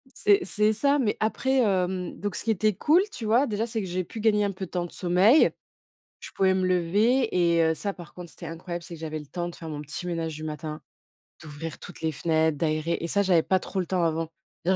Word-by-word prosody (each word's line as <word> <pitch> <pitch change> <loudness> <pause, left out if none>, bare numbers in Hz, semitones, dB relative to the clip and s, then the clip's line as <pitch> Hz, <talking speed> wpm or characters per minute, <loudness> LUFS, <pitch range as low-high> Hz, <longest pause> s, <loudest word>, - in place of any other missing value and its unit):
C'est 205 -1 +4
c'est 210 +4 +2
ça, 280 +6 +2
mais 220 -6 +1
après, 265 +5 +1
hem, 185 -5 0
donc 205 -1 -3
ce - - +2
qui 225 - +1
était 215 0 +2
cool, 310 - +4
tu 230 - -6
vois, 235 +6 +4
déjà, 215 +1 -1
c'est 225 -1 -2
que 190 - -5
j'ai 180 +1 -2
pu 220 - -9
gagner 210 -1 +3
un 200 - 0
peu 190 0 -6
de - - -17
temps 175 -1 -1
de 175 - -10
sommeil. 185 - +4 0.7
Je - - -9
pouvais 190 -1 +2
me 185 0 0
lever 205 +8 +2
et 170 -2 +3
heu, 160 0 +2
ça, 200 +5 0
par 175 -4 -12
contre, 175 -2 -9
c'était 170 - -9
incroyable, 170 +1 -6
c'est 170 - -9
que 160 - -11
j'avais 155 -1 -4
le 150 - -10
temps 175 +4 -4
de 175 - -9
faire 165 - -8
mon 150 -1 -5
petit 150 +4 -5
ménage 165 -3 -3
du 155 - -7
matin, 155 0 -6 0.6
d'ouvrir 155 +1 -7
toutes - - -10
les 160 0 -1
fenêtres, 160 +1 +1
d'aérer. 155 +2 0
Et 170 - -3
ça, 200 - +2
j'avais 180 -4 +3
pas 190 - +2
trop 190 +1 -4
le - - -1
temps 180 -1 0
avant. 165 0 -1 0.3
Je 180 - +2
veux - - +4
180 Hz, 255 wpm, -26 LUFS, 165-210 Hz, 0.7 s, C'est